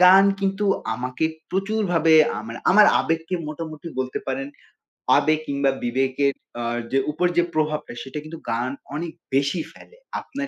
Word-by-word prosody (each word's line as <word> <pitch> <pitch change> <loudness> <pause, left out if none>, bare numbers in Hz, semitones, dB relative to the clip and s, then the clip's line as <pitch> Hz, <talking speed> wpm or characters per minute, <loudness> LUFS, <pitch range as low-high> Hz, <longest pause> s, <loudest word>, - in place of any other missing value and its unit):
গান 185 +2 +8 0.2
কিন্তু 195 +1 0 0.3
আমাকে 125 +5 -2 0.3
প্রচুরভাবে 190 -5 +1 0.3
আমার 115 +2 -7
আমার 210 +3 +8
আবেগকে 165 +2 -1
মোটামুটি 155 +1 -7
বলতে 130 0 -2
পারেন। 135 +1 -2 0.7
আবেগ 155 0 +3
কিংবা 140 -1 +1
বিবেকের 135 +3 +1 0.3
আ - - -2 0.3
যে 135 - +3
উপর 180 +4 +1
যে 175 - +6
প্রভাবটা 155 -4 -1
সেটা 135 +3 -6
কিন্তু 160 +1 -9
গান 120 +3 -1 0.2
অনেক 165 +1 -3 0.2
বেশি 140 +5 +2
ফেলে। 470 - -17 0.2
আপনার 275 0 -5
155 Hz, 145 wpm, -23 LUFS, 135-180 Hz, 0.7 s, গান